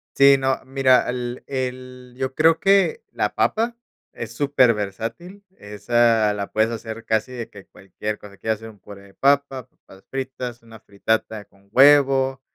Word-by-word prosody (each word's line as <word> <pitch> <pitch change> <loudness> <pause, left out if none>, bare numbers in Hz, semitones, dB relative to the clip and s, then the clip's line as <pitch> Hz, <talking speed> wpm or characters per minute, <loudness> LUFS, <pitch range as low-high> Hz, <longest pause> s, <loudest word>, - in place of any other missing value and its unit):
Sí, 140 0 +6
no, 135 0 0
mira, 130 -1 +3
el 125 0 -5
el 125 -1 -6
yo 130 0 -3
creo 160 +3 +3
que 200 - +2
la - - -2
papa 230 +2 0 0.4
es 115 0 -8
superversátil. 125 - -1 0.2
Esa 110 +1 +1
la 100 -1 -5
puedes 110 +2 +1
hacer 115 0 -7
casi 110 +3 -1
de 120 -2 -6
que 100 -2 -14
cualquier 105 +3 -7
cosa: 100 -1 -14
¿quieres 110 +1 -2
hacer 110 0 -10
un 105 -2 -17
puré 100 0 -13
de 100 - -18
papa, 140 0 +1
papas 95 0 -20
fritas, 130 -3 -6
una 115 -1 -14
fritata 110 0 -3
con 100 0 -28
huevo, 135 0 +4
125 Hz, 160 wpm, -22 LUFS, 110-135 Hz, 0.4 s, Sí